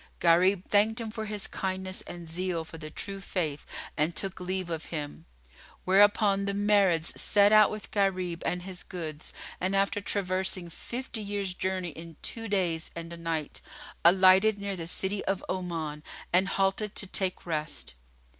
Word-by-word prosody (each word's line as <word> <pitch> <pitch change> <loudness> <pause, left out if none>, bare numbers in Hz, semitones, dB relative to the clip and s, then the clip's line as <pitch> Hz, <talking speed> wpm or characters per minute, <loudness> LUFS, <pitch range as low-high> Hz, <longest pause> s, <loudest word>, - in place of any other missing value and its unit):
Gharib 180 +3 +4
thanked 215 +3 +3
him 225 -2 -4
for 220 -1 -4
his 210 -2 -2
kindness 190 0 -2
and 175 -1 -8
zeal 170 0 -1
for 165 0 -11
the 155 -1 -7
True 195 +5 -4
Faith 160 -7 -2 0.3
and 155 +3 0
took 195 -1 -2
leave 185 -1 -2
of 160 -1 -3
him; 150 -3 -5 0.6
whereupon 200 +1 +4
the 200 - -1
Marids 200 -5 +3
set 205 0 +5
out 215 -1 +7
with 215 -1 -7
Gharib 185 -4 0
and 180 0 -1
his 185 -1 -6
goods; 155 -4 -6 0.3
and, 190 +2 0
after 200 +1 +1
traversing 185 -3 -1
fifty 240 +3 -5
years' 200 -2 -2
journey 185 -1 -2
in 165 +1 -10
two 225 -1 -2
days 175 -5 0
and 170 0 -6
a - - -7
night, 165 -2 -3 0.4
alighted 190 +4 +6
near 200 -1 -3
the 165 -2 -5
city 190 +3 -1
of 195 -1 -1
Oman 165 -5 -3 0.3
and 185 +2 +5
halted 195 +2 0
to - - -1
take 190 -1 -1
rest. 155 -3 -2
185 Hz, 165 wpm, -29 LUFS, 170-200 Hz, 0.6 s, out